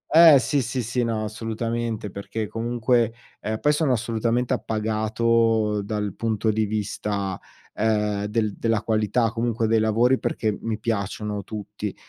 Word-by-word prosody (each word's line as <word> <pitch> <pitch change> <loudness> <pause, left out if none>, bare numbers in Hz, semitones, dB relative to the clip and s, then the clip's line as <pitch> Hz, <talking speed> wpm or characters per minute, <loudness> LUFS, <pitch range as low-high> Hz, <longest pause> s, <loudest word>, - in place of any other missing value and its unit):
eh, 160 -3 +10
sì, 140 +2 +1
sì, 125 +1 -2
sì, 120 +2 -1
no, 115 -2 -1
assolutamente! 115 -1 -3
Perché 105 +2 -4
comunque, 115 +1 +1 0.3
ehm, 110 0 -3
poi 150 - +3
sono 150 -3 +2
assolutamente 115 +1 0
appagato 110 0 +1
dal 105 -1 -3
punto 110 -1 0
di 110 0 +1
vista, 100 -2 -2 0.3
ehm, 105 -2 0
del 105 0 0
della 115 -2 0
qualità, 110 +1 +1
comunque 115 0 -1
dei 110 0 +3
lavori 115 +4 +3
perché 110 -2 -1
mi 115 -1 -2
piacciono 105 -2 -2
tutti. 105 0 -6
110 Hz, 140 wpm, -24 LUFS, 105-115 Hz, 0.3 s, eh